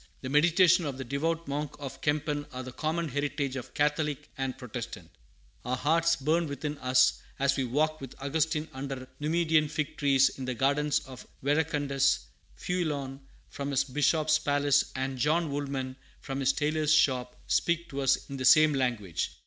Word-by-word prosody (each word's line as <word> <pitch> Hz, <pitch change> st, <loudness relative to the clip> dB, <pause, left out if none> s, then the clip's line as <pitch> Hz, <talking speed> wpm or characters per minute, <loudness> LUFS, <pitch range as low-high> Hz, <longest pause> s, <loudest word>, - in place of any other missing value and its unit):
The 130 Hz, -, -5 dB
meditations 175 Hz, +3 st, +4 dB
of 135 Hz, -2 st, -4 dB
the 135 Hz, -, -4 dB
devout 160 Hz, +6 st, -2 dB
monk 145 Hz, +1 st, -3 dB
of 140 Hz, -2 st, -8 dB
Kempen 145 Hz, 0 st, -1 dB
are 130 Hz, -1 st, -6 dB
the 130 Hz, -, -7 dB
common 160 Hz, +4 st, -2 dB
heritage 145 Hz, 0 st, -2 dB
of 130 Hz, -, -7 dB
Catholic 150 Hz, -1 st, 0 dB
and 135 Hz, -1 st, -3 dB
Protestant; 120 Hz, -, -7 dB, 0.5 s
our 125 Hz, +1 st, -1 dB
hearts 165 Hz, +4 st, +2 dB
burn 160 Hz, +4 st, +1 dB
within 145 Hz, +1 st, -4 dB
us 130 Hz, 0 st, +3 dB, 0.2 s
as 140 Hz, 0 st, +2 dB
we 135 Hz, -, 0 dB
walk 155 Hz, +5 st, 0 dB
with 135 Hz, -1 st, -8 dB
Augustine 155 Hz, +2 st, -1 dB
under 130 Hz, -1 st, -6 dB
Numidian 155 Hz, 0 st, +2 dB
fig 150 Hz, +1 st, -3 dB
trees 135 Hz, -2 st, +4 dB
in 130 Hz, -, -7 dB
the 130 Hz, -1 st, -3 dB
gardens 145 Hz, +3 st, +1 dB
of 130 Hz, -1 st, -11 dB, 0.2 s
Verecundus; 145 Hz, -2 st, +1 dB, 0.4 s
Feuelon 145 Hz, -7 st, -2 dB, 0.3 s
from 140 Hz, 0 st, -5 dB
his 140 Hz, -1 st, +2 dB
bishop's 155 Hz, +3 st, +2 dB
palace 145 Hz, -1 st, +2 dB
and 130 Hz, 0 st, -3 dB
John 155 Hz, +3 st, +1 dB
Woolman 135 Hz, -2 st, -3 dB, 0.2 s
from 135 Hz, -1 st, -5 dB
his 135 Hz, 0 st, +3 dB
tailor's 150 Hz, +2 st, 0 dB
shop 130 Hz, -5 st, +2 dB
speak 170 Hz, 0 st, +1 dB
to 140 Hz, 0 st, -4 dB
us 135 Hz, -, +2 dB
in 140 Hz, -, -6 dB
the 130 Hz, -, -3 dB
same 155 Hz, +3 st, +7 dB
language. 120 Hz, -, -1 dB
145 Hz, 165 wpm, -29 LUFS, 135-155 Hz, 0.5 s, same